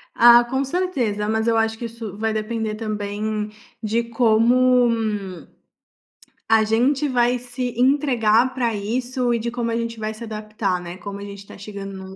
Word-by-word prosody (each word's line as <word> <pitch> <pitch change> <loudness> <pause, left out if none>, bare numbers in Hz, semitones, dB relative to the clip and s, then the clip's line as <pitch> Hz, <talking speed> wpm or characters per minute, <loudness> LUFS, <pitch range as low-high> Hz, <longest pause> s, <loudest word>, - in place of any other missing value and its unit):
Ah, 240 0 +8
com 265 +3 -1
certeza. 260 - -1
Mas 220 +1 0
eu 230 -1 +3
acho 225 0 +1
que 235 - -5
isso 225 -3 -7
vai 220 +1 -1
depender 220 0 -2
também 210 0 -3 0.3
de 225 +1 0
como 240 +2 +3 1.6
a 225 -1 +5
gente 255 +7 +2
vai 245 -1 +2
se 245 0 -5
entregar 255 -3 +3
pra 240 -3 0
isso 245 +4 -1
e 235 - 0
de 235 +1 -2
como 235 -1 -2
a - - -1
gente 230 -1 -4
vai 215 0 -3
se 220 +2 -10
adaptar, 215 -4 -3
né, 175 +1 -8
como 200 +2 -7
a - - -9
gente 200 0 -8
está 200 - -12
chegando 200 -1 -8
num 190 0 -9
225 Hz, 175 wpm, -22 LUFS, 215-245 Hz, 1.6 s, Ah